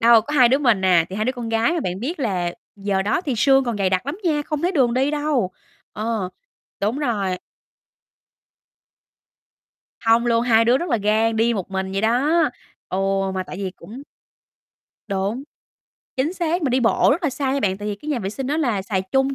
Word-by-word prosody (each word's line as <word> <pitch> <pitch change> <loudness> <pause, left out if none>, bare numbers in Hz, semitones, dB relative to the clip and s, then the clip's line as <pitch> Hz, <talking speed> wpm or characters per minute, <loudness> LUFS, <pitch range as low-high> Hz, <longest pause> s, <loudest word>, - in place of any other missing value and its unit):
Đâu, 230 -1 +7
có 290 +7 -5
2 255 -4 +6
đứa 265 +3 +3
mình 235 -9 +2
à, 175 -3 +5
thì 190 - -5
2 215 - 0
đứa 255 - 0
con 240 -3 -6
gái, 225 +5 +2
mà 340 - -1
bạn 185 -7 -3
biết 295 +6 -4
là 180 -7 -1 0.2
giờ 195 -1 -1
đó 210 - 0
thì 290 -8 -2
sương 270 +3 +4
còn 235 -3 -2
dày 190 -2 +1
đặc 185 +6 0
lắm 295 +6 -4
nha, 300 -3 +1
không 300 0 -4
thấy 355 +2 +1
đường 255 -8 +2
đi 265 +3 +2
đâu. 295 -9 0 0.4
Ờ, 215 -3 -2 0.5
đúng 215 +7 0
rồi. 205 -10 -1 2.6
Hông 230 +1 +3
luôn, 230 0 +3
hai 230 -2 +4
đứa 245 +3 +4
rất 345 - -3
là 235 - +3
gan, 220 +2 +1
đi 230 +1 +2
một 195 -2 -4
mình 190 0 -3
vậy 195 - -1
đó. 270 +10 +2 0.5
Ừ, 185 - -2 0.4
mà 185 - -1
tại 185 - -9
vì 195 -2 -3
cũng 245 +6 -10 1.1
Đúng, 200 +6 -2 0.7
chính 275 +6 0
xác! 345 -1 -1
Mình 275 - +1
đi 255 - +2
bộ 230 - +3
rất 330 - -2
là 305 - +2
xa 265 0 -2
nha 280 - 0
bạn, 190 -4 0
tại 210 0 -4
vì 205 - -2
cái 295 - -10
nhà 285 - 0
vệ 195 -3 -3
sinh 265 +5 -5
nó 295 +3 0
là 235 -11 0
xài 190 -1 -1
chung 270 +8 0
235 Hz, 215 wpm, -22 LUFS, 200-275 Hz, 2.6 s, Đâu